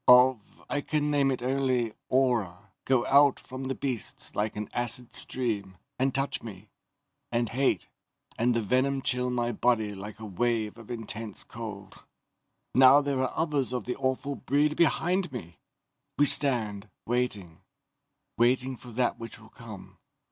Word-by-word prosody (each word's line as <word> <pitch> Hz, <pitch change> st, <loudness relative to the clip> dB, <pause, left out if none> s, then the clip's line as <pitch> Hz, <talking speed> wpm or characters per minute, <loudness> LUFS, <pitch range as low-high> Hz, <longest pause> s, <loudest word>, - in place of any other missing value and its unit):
"Of... 125 Hz, 0 st, +7 dB, 0.3 s
I 145 Hz, -, -1 dB
can 150 Hz, 0 st, 0 dB
name 140 Hz, -2 st, +3 dB
it 130 Hz, -2 st, -2 dB
only 130 Hz, -3 st, +1 dB, 0.2 s
aura, 110 Hz, -7 st, +1 dB
go 130 Hz, -2 st, +2 dB
out 140 Hz, 0 st, +5 dB
from 130 Hz, +1 st, -7 dB
the 135 Hz, 0 st, -2 dB
beasts 130 Hz, -5 st, -4 dB
like 105 Hz, +1 st, -1 dB
an 105 Hz, 0 st, -4 dB
acid 120 Hz, 0 st, -3 dB
stream, 105 Hz, -7 st, -2 dB, 0.2 s
and 135 Hz, +1 st, +2 dB
touch 135 Hz, +2 st, -1 dB
me, 105 Hz, -2 st, -10 dB, 0.6 s
and 120 Hz, 0 st, +1 dB
the -, -, -11 dB
hate, 135 Hz, +2 st, +1 dB, 0.5 s
and 120 Hz, +1 st, +2 dB
the 115 Hz, -, +1 dB
venom 130 Hz, +4 st, +1 dB
chill 125 Hz, 0 st, 0 dB
my 120 Hz, -1 st, 0 dB
body 110 Hz, -2 st, +1 dB
like 105 Hz, +2 st, -8 dB
a 110 Hz, -, -7 dB
wave 110 Hz, +2 st, -1 dB
of 115 Hz, -, -13 dB
intense 115 Hz, -3 st, -4 dB
cold. 105 Hz, -4 st, -9 dB, 0.7 s
"Now 135 Hz, +2 st, +8 dB
there 140 Hz, -2 st, -1 dB
are 130 Hz, -, -1 dB
others 150 Hz, -6 st, 0 dB
of 125 Hz, -4 st, -3 dB
the 125 Hz, -, -2 dB
awful 135 Hz, +1 st, -1 dB
breed 150 Hz, +3 st, +1 dB
behind 175 Hz, +2 st, +2 dB
me. 85 Hz, -, -8 dB, 0.6 s
We 145 Hz, -, +5 dB
stand, 110 Hz, -8 st, +2 dB, 0.2 s
waiting, 105 Hz, -8 st, -2 dB, 0.8 s
waiting 125 Hz, +2 st, +2 dB
for 125 Hz, -, -12 dB
that 125 Hz, +1 st, 0 dB
which 115 Hz, -1 st, -8 dB
will 110 Hz, 0 st, -16 dB
come. 110 Hz, -5 st, -12 dB
125 Hz, 155 wpm, -28 LUFS, 110-135 Hz, 0.8 s, Now